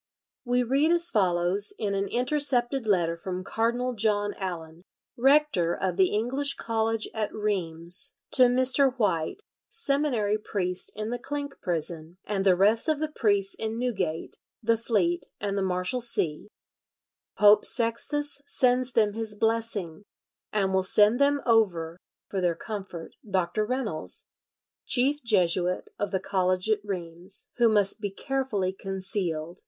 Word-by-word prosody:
We 245 Hz, 0 st, +2 dB
read 275 Hz, +6 st, +2 dB
as 345 Hz, 0 st, +3 dB
follows 185 Hz, 0 st, +1 dB
in 205 Hz, -2 st, -2 dB
an 195 Hz, 0 st, -1 dB
intercepted 250 Hz, 0 st, 0 dB
letter 170 Hz, -5 st, +2 dB
from 180 Hz, +2 st, -5 dB
Cardinal 240 Hz, +5 st, -1 dB
John 205 Hz, -2 st, 0 dB
Allen, 170 Hz, -3 st, -6 dB, 0.3 s
Rector 270 Hz, -, +3 dB
of 185 Hz, -2 st, -2 dB
the 190 Hz, 0 st, +4 dB
English 265 Hz, +8 st, +1 dB
College 225 Hz, -1 st, -1 dB
at 215 Hz, -2 st, -2 dB
Rheims, 185 Hz, -, -1 dB, 0.2 s
to 255 Hz, -2 st, +6 dB
Mr. 260 Hz, +1 st, +4 dB
White, 205 Hz, -, -1 dB, 0.3 s
seminary 275 Hz, -, +1 dB
priest 180 Hz, -4 st, -2 dB
in 215 Hz, +1 st, -4 dB
the 245 Hz, -, -3 dB
Clink 285 Hz, +2 st, -5 dB
Prison, 165 Hz, 0 st, -3 dB
and 200 Hz, -2 st, -1 dB
the 190 Hz, -2 st, +5 dB
rest 215 Hz, -, +3 dB
of 310 Hz, -, +2 dB
the 310 Hz, +1 st, -3 dB
priests 200 Hz, -7 st, +1 dB
in 220 Hz, 0 st, -4 dB
Newgate, 195 Hz, -10 st, -3 dB, 0.3 s
the 230 Hz, +1 st, +3 dB
Fleet, 205 Hz, -7 st, 0 dB
and 200 Hz, -1 st, -2 dB
the 200 Hz, -, 0 dB
Marshalsea. 185 Hz, -2 st, -1 dB, 0.9 s
"Pope 210 Hz, 0 st, +6 dB
Sextus 275 Hz, +5 st, -1 dB
sends 255 Hz, -1 st, +1 dB
them 210 Hz, -2 st, +2 dB
his 220 Hz, -1 st, -4 dB
blessing, 220 Hz, -6 st, -2 dB, 0.5 s
and 195 Hz, -2 st, 0 dB
will 190 Hz, -, +3 dB
send 210 Hz, +5 st, +3 dB
them 285 Hz, 0 st, +3 dB
over 180 Hz, -8 st, +1 dB, 0.3 s
for 195 Hz, -, -3 dB
their 175 Hz, -2 st, +1 dB
comfort 195 Hz, -6 st, -7 dB, 0.2 s
Dr. 190 Hz, +3 st, 0 dB
Reynolds, 235 Hz, -11 st, +1 dB, 0.6 s
chief 280 Hz, +4 st, +2 dB
Jesuit 180 Hz, -4 st, +1 dB
of 205 Hz, -, -1 dB
the 190 Hz, -1 st, -1 dB
college 185 Hz, +2 st, 0 dB
at 210 Hz, -1 st, 0 dB
Rheims, 180 Hz, 0 st, -6 dB
who 235 Hz, -2 st, +4 dB
must 210 Hz, 0 st, +1 dB
be 205 Hz, -, -2 dB
carefully 210 Hz, -4 st, -2 dB
concealed 185 Hz, -4 st, -3 dB
210 Hz, 140 wpm, -27 LUFS, 185-245 Hz, 0.9 s, to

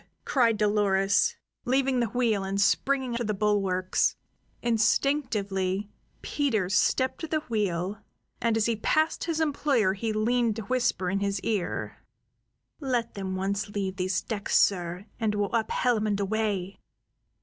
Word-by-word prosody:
cried 235 Hz, -5 st, +3 dB
Dolores, 205 Hz, -, +2 dB, 0.3 s
leaving 260 Hz, 0 st, +1 dB
the 235 Hz, -, +1 dB
wheel 225 Hz, -4 st, +1 dB
and 195 Hz, +1 st, -2 dB
springing 260 Hz, +4 st, +1 dB
to 240 Hz, -, -2 dB
the 215 Hz, -2 st, -1 dB
bulwarks. 195 Hz, -3 st, +1 dB, 0.5 s
Instinctively 210 Hz, -5 st, 0 dB, 0.3 s
Peters 220 Hz, -10 st, 0 dB
stepped 260 Hz, 0 st, +1 dB
to 325 Hz, -, -3 dB
the 310 Hz, 0 st, -1 dB
wheel, 200 Hz, -, -2 dB, 0.4 s
and 230 Hz, -1 st, +2 dB
as 220 Hz, -, +2 dB
he 235 Hz, -, +1 dB
passed 310 Hz, +8 st, +1 dB
his 330 Hz, -2 st, -1 dB
employer 280 Hz, -9 st, +2 dB
he 220 Hz, +3 st, -2 dB
leaned 230 Hz, +1 st, +1 dB
to 220 Hz, -, -5 dB
whisper 240 Hz, -5 st, 0 dB
in 195 Hz, -, 0 dB
his 200 Hz, -1 st, -1 dB
ear: 205 Hz, -6 st, -2 dB, 0.8 s
"Let 245 Hz, -5 st, -1 dB
them 190 Hz, -1 st, -4 dB
once 200 Hz, +2 st, -2 dB
leave 195 Hz, -2 st, -3 dB
these 185 Hz, 0 st, -1 dB
decks, 210 Hz, -3 st, 0 dB
sir, 180 Hz, 0 st, +1 dB
and 215 Hz, -2 st, 0 dB
we'll 205 Hz, +1 st, -1 dB
up 225 Hz, -1 st, 0 dB
hellum 225 Hz, -4 st, +1 dB
and 205 Hz, -1 st, 0 dB
away!" 200 Hz, -2 st, -1 dB
215 Hz, 145 wpm, -27 LUFS, 195-245 Hz, 0.8 s, cried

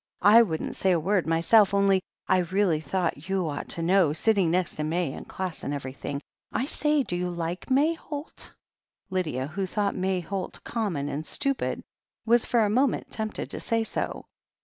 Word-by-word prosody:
I 210 Hz, +4 st, +8 dB
wouldn't 165 Hz, -9 st, -2 dB
say 190 Hz, -1 st, +3 dB
a 170 Hz, -, +2 dB
word 185 Hz, +2 st, +1 dB
myself, 195 Hz, +5 st, +4 dB
only 195 Hz, -1 st, +4 dB, 0.3 s
I 185 Hz, -, +4 dB
really 180 Hz, -2 st, +1 dB
thought 170 Hz, 0 st, -2 dB
you 190 Hz, -3 st, 0 dB
ought 145 Hz, -2 st, -4 dB
to 165 Hz, -, -1 dB
know, 175 Hz, -3 st, +4 dB
sitting 195 Hz, 0 st, +2 dB
next 180 Hz, +1 st, 0 dB
to 155 Hz, -, -1 dB
May 160 Hz, -2 st, -1 dB
in -, -, -8 dB
class 185 Hz, -3 st, -5 dB
and 145 Hz, -, -2 dB
everything. 140 Hz, +1 st, -5 dB, 0.3 s
I 255 Hz, -, 0 dB
say, 300 Hz, -1 st, +1 dB
do 175 Hz, -, -3 dB
you 180 Hz, 0 st, -1 dB
like 175 Hz, +3 st, -4 dB
May 285 Hz, +5 st, +4 dB
Holt?" 300 Hz, -2 st, -8 dB, 0.6 s
Lydia, 155 Hz, -9 st, -1 dB
who 185 Hz, +7 st, -3 dB
thought 205 Hz, +1 st, 0 dB
May 185 Hz, 0 st, 0 dB
Holt 190 Hz, +3 st, -5 dB
common 195 Hz, -12 st, -2 dB
and 145 Hz, +2 st, -3 dB
stupid, 275 Hz, -, -1 dB, 0.4 s
was 235 Hz, +1 st, +4 dB
for 235 Hz, -, +2 dB
a 215 Hz, -, +3 dB
moment 250 Hz, +5 st, +1 dB
tempted 220 Hz, -1 st, -4 dB
to -, -, -4 dB
say 230 Hz, -1 st, 0 dB
so. -, -, -3 dB
185 Hz, 185 wpm, -27 LUFS, 165-215 Hz, 0.6 s, I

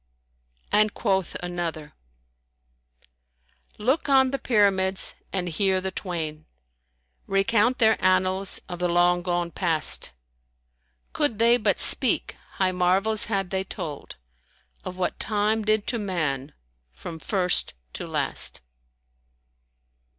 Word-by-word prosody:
And 215 Hz, 0 st, +3 dB
quoth 190 Hz, -4 st, -1 dB
another, 170 Hz, -4 st, -4 dB, 1.8 s
"Look 260 Hz, +8 st, 0 dB
on 265 Hz, -1 st, +5 dB
the 275 Hz, -, -2 dB
Pyramids, 195 Hz, -4 st, +2 dB, 0.2 s
and 185 Hz, -2 st, -2 dB
hear 190 Hz, +3 st, +2 dB
the 190 Hz, 0 st, -3 dB
twain 160 Hz, -5 st, -5 dB, 0.4 s
* 60 Hz, 0 st, -45 dB
Recount 220 Hz, +5 st, +2 dB
their 220 Hz, -2 st, +3 dB
annals 185 Hz, +1 st, +2 dB
of 175 Hz, -1 st, -7 dB
the 180 Hz, -, +1 dB
long 175 Hz, +1 st, +3 dB
gone 175 Hz, -1 st, -2 dB
Past: 165 Hz, -4 st, +1 dB, 1.0 s
Could 290 Hz, -8 st, 0 dB
they 235 Hz, +2 st, +5 dB
but 230 Hz, -, 0 dB
speak, -, -, +3 dB, 0.2 s
high 190 Hz, -1 st, +1 dB
marvels 190 Hz, +4 st, +2 dB
had 195 Hz, -4 st, -2 dB
they 190 Hz, 0 st, -1 dB
told 150 Hz, -6 st, -7 dB, 0.3 s
* -, -, -38 dB
Of 185 Hz, 0 st, -7 dB
what 185 Hz, -, -2 dB
Time 215 Hz, +1 st, 0 dB
did 215 Hz, 0 st, +1 dB
to 235 Hz, -, 0 dB
man 155 Hz, -9 st, -2 dB, 0.4 s
from 110 Hz, -, -9 dB
first 180 Hz, 0 st, 0 dB, 0.2 s
to -, -, -5 dB
last." -, -, -3 dB
190 Hz, 120 wpm, -25 LUFS, 175-215 Hz, 1.8 s, on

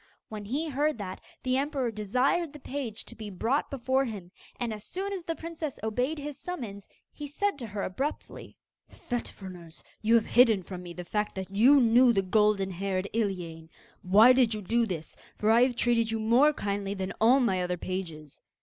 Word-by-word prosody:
When 210 Hz, -1 st, -7 dB
he 285 Hz, +10 st, -2 dB
heard 295 Hz, 0 st, 0 dB
that, 190 Hz, -3 st, -6 dB, 0.2 s
the 255 Hz, 0 st, +1 dB
emperor 275 Hz, -3 st, -1 dB
desired 255 Hz, -, 0 dB
the 295 Hz, -, -10 dB
page 255 Hz, -6 st, -5 dB
to -, -, -10 dB
be 215 Hz, -2 st, -7 dB
brought 230 Hz, +9 st, -1 dB
before 265 Hz, 0 st, 0 dB
him, 200 Hz, -7 st, -7 dB, 0.3 s
and, 235 Hz, -3 st, -2 dB
as 210 Hz, -1 st, -8 dB
soon 390 Hz, +7 st, -4 dB
as 365 Hz, -4 st, -5 dB
the 330 Hz, -, -2 dB
princess 325 Hz, -4 st, -6 dB
obeyed 250 Hz, +8 st, -1 dB
his 290 Hz, -1 st, -6 dB
summons, 225 Hz, -, -6 dB, 0.3 s
he 295 Hz, -, -7 dB
said 395 Hz, +3 st, -1 dB
to 240 Hz, -, -5 dB
her 205 Hz, -1 st, -4 dB
abruptly: 270 Hz, +11 st, -5 dB, 0.3 s
'Fet 245 Hz, -1 st, -4 dB
Fruners, 175 Hz, -4 st, -11 dB, 0.2 s
you 225 Hz, +2 st, +4 dB
have 230 Hz, -, +4 dB
hidden 230 Hz, -6 st, +4 dB
from 180 Hz, +1 st, -7 dB
me 175 Hz, -1 st, -9 dB
the 180 Hz, +1 st, -8 dB
fact 210 Hz, +3 st, -2 dB
that 190 Hz, +1 st, -6 dB
you 260 Hz, +7 st, +6 dB
knew 240 Hz, 0 st, +5 dB
the 195 Hz, -2 st, +2 dB
golden 200 Hz, 0 st, +2 dB
haired 190 Hz, +1 st, -2 dB
Iliane! 175 Hz, -7 st, -3 dB, 0.3 s
Why 215 Hz, +7 st, +7 dB
did 245 Hz, -4 st, +3 dB
you 210 Hz, -, -6 dB
do 230 Hz, +4 st, +1 dB
this? 165 Hz, -5 st, -5 dB, 0.2 s
for 215 Hz, +1 st, +2 dB
I 230 Hz, +2 st, +5 dB
have 250 Hz, -1 st, +3 dB
treated 235 Hz, -1 st, +2 dB
you 225 Hz, 0 st, -1 dB
more 240 Hz, +7 st, +4 dB
kindly 200 Hz, -6 st, -3 dB
than 190 Hz, 0 st, -4 dB
all 245 Hz, +5 st, +6 dB
my 195 Hz, -8 st, +1 dB
other 180 Hz, 0 st, -2 dB
pages. 165 Hz, -5 st, -6 dB
225 Hz, 195 wpm, -28 LUFS, 195-265 Hz, 0.3 s, Why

